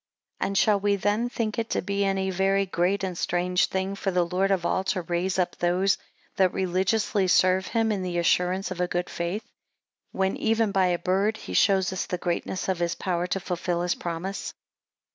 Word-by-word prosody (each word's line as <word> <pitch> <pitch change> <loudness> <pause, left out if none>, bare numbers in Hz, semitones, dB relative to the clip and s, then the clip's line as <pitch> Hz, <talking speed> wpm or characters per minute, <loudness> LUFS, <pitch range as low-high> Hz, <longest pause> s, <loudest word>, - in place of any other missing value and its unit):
6 - - 0
And 195 - -2
shall 210 -1 +4
we 200 0 +2
then 205 +5 0
think 230 -1 -2
it 225 - -2
to - - 0
be 200 +1 -1
any 195 -1 0
very 195 +1 +2
great 185 +2 0
and 185 -2 -2
strange 180 +2 +1
thing 190 +1 -2
for 195 0 -2
the 180 -2 +2
Lord 185 +3 0
of 190 -3 +1
all 190 - +1
to 185 -2 -1
raise 175 +3 -1
up 180 -2 0
those 180 +3 +2 0.4
that 185 -2 +4
religiously 190 +2 +1
serve 185 +1 +3
him 225 -1 +1
in 200 -3 -1
the 180 -1 -3
assurance 180 +3 +1
of 180 -1 -3
a 180 - +1
good 175 0 -2
faith, 180 +6 -3 0.7
when 190 0 0
even 225 -1 +1
by 190 -2 +3
a 175 -1 +1
bird 195 +5 0
he - - -8
shows 190 -1 +3
us 190 - -3
the 180 - -2
greatness 175 +2 -2
of 190 -2 0
his 170 -1 0
power 180 -2 -1
to 195 - -1
fulfil 175 -1 -2
his 180 - +1
promise? 175 +3 -5
190 Hz, 205 wpm, -26 LUFS, 180-195 Hz, 0.7 s, shall